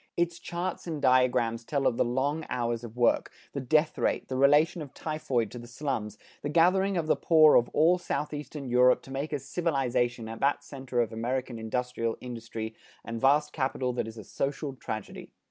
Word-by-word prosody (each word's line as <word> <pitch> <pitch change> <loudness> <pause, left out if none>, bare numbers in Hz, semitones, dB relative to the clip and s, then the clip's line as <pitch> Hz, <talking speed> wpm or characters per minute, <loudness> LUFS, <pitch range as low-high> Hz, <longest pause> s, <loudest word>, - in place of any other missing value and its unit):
Its 170 0 0
charts 175 +1 -4
and 160 -3 -3
diagrams 125 -3 +3
tell 140 +2 -1
of 115 - +3
the - - +2
long 135 +6 -1
hours 120 -1 -1
of 120 0 -9
work, 120 - +2 0.2
the 140 - -2
death 155 +4 +2
rate, - - 0
the 130 - -2
relation 150 +6 +4
of 145 -3 -9
typhoid 135 -8 -2
to 120 - -7
the 120 - -10
slums, 120 -5 -3 0.2
the 145 - -3
gathering 185 +4 +3
of 165 - 0
the 155 - +3
poor 155 -2 +6
of 120 - +4
all 170 +4 +4
Southeastern 150 -4 -4
Europe 125 +1 +4
to 135 - -12
make 140 +3 -3
a 145 - 0
civilization 130 -6 -1
at 115 0 -7
that 140 +1 +1
center 130 -3 -2
of 115 -1 -2
American 120 +1 -3
industrial 115 0 -2
energy 115 -2 -6 0.3
and 115 0 -5
vast 150 +2 +3
capital 130 -2 -1
that 120 - -2
is 110 0 -9
a 110 - -8
social 140 +5 -3
tragedy. 110 -5 -7
130 Hz, 190 wpm, -28 LUFS, 120-150 Hz, 0.3 s, poor